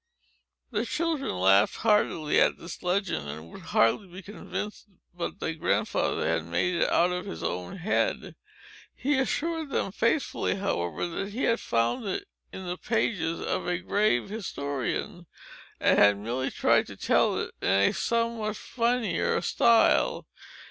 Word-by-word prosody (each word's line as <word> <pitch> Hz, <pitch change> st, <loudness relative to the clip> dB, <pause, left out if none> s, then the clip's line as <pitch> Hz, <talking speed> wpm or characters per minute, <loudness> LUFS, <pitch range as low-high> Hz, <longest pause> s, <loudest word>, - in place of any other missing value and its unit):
The 215 Hz, -1 st, 0 dB
children 315 Hz, +2 st, -1 dB
laughed 95 Hz, +2 st, +4 dB
heartily 210 Hz, -8 st, +2 dB
at -, -, +3 dB
this 170 Hz, -, -9 dB
legend, 180 Hz, -, -1 dB
and 80 Hz, +3 st, -8 dB
would -, -, -10 dB
hardly 115 Hz, -, +2 dB
be 185 Hz, +2 st, -11 dB
convinced 210 Hz, +1 st, -6 dB, 0.3 s
but 175 Hz, -1 st, -5 dB
that 165 Hz, 0 st, -3 dB
Grandfather -, -, 0 dB
had 80 Hz, -, 0 dB
made 85 Hz, -, 0 dB
it 170 Hz, -, +1 dB
out 175 Hz, +1 st, +3 dB
of 180 Hz, 0 st, -3 dB
his 80 Hz, -, -6 dB
own 90 Hz, -, -3 dB
head. 190 Hz, +5 st, -1 dB, 0.6 s
He 280 Hz, 0 st, +1 dB
assured 320 Hz, +3 st, -1 dB
them 195 Hz, -, -1 dB
faithfully, 230 Hz, +1 st, 0 dB
however, 85 Hz, -, -2 dB
that 195 Hz, +4 st, -4 dB
he 245 Hz, -, -3 dB
had 230 Hz, 0 st, +2 dB
found 115 Hz, -, 0 dB
it 190 Hz, -, -3 dB, 0.3 s
in 190 Hz, -, -8 dB
the 180 Hz, 0 st, -4 dB
pages 180 Hz, -7 st, -1 dB
of -, -, -2 dB
a 180 Hz, 0 st, +1 dB
grave 185 Hz, -, +1 dB
historian, 170 Hz, -, -4 dB, 0.5 s
and -, -, +4 dB
had 100 Hz, 0 st, +6 dB
merely 120 Hz, +6 st, -2 dB
tried -, -, +2 dB
to -, -, -10 dB
tell -, -, +2 dB
it -, -, -4 dB
in -, -, 0 dB
a 100 Hz, +1 st, +4 dB
somewhat 230 Hz, -2 st, -1 dB
funnier 235 Hz, -6 st, 0 dB
style. 230 Hz, +5 st, +3 dB
180 Hz, 150 wpm, -27 LUFS, -, 0.6 s, had